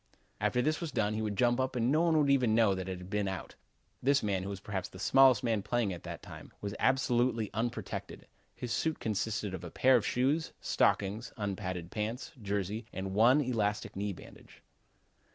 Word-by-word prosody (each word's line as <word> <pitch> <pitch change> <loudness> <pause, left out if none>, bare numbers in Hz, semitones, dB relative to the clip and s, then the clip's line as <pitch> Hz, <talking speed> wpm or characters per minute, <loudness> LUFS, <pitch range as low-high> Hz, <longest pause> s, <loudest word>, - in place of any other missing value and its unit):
"After 125 - +1
this 155 +4 0
was 165 -3 -3
done, 105 -1 0
he 110 - -2
would 105 -2 -2
jump 120 +2 +3
up 130 0 -1
and 120 +1 +1
no 155 +2 +3
one 165 -2 +3
would 145 -2 +3
ever 130 -3 +3
know 110 -2 +4
that 95 0 -4
it 95 - -3
had 90 +1 -10
been 105 -2 0
out. 95 -1 -5 0.5
This 140 +2 +3
man, 100 -3 0
who 100 +1 -4
perhaps 95 -1 -4
was - - -25
the - - -1
smallest 135 -2 +6
man 115 -4 +1
playing 115 -2 0
at 85 - -8
that - - -8
time, - - -11
was 100 -1 -4
absolutely 125 -4 +2
unprotected. 115 +2 -4 0.3
His 120 -2 -4
suit 160 +6 -1
consisted 105 -1 -2
of 95 - -6
a 85 - -6
pair 130 +10 +4
of 120 - +3
shoes, 140 +9 0
stockings, 105 +4 +1
unpadded 95 -4 -4
pants, 110 +7 -3
jersey 100 +2 -2
and 95 0 -4
one 120 +8 +5
elastic 110 -4 -1
knee 100 +1 -2
bandage." 90 - -14
110 Hz, 200 wpm, -31 LUFS, 100-125 Hz, 0.5 s, smallest